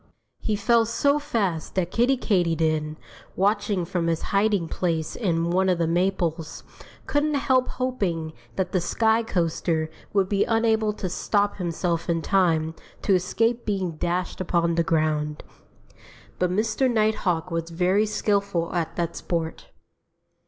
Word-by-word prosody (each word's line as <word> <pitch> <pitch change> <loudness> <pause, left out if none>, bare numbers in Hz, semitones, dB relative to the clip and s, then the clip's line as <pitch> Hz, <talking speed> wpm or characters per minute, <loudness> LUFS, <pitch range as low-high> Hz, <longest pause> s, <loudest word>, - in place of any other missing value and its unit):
He 215 - -1
fell 225 +2 +3
so 280 +5 +2
fast 210 - -2
that 180 -2 0
Kiddie 250 +3 +3
Katydid, 160 -7 +1 0.4
watching 200 -2 +1
from 170 -1 -1
his 165 -1 0
hiding 200 -3 +2
place 165 -2 -2
in 170 -6 0
one 190 +1 +2
of 180 - +2
the 170 - +1
maples, 170 -2 -1 0.4
couldn't 295 +1 +1
help 260 -2 +2
hoping 190 -11 -2 0.2
that 190 - -1
the 185 - +1
sky 220 +5 +2
coaster 165 -5 -1 0.2
would 195 -2 +2
be 200 0 +2
unable 225 -1 +2
to 195 - -4
stop 205 +3 0
himself 170 -2 -2
in 165 -1 0
time 165 -5 +2 0.3
to 200 - +3
escape 225 +6 +1
being 190 -4 -1
dashed 175 +4 -2
upon 170 -2 +1
the 170 - +2
ground. 155 -2 0 1.0
But 180 - +2
Mr. 220 +7 +1
Nighthawk 215 -6 +1
was 165 0 -2
very 185 +5 +2
skillful 200 -5 0
at 170 -2 -2
that 170 -1 -2
sport. 165 -2 -3
185 Hz, 140 wpm, -25 LUFS, 165-215 Hz, 1.0 s, fell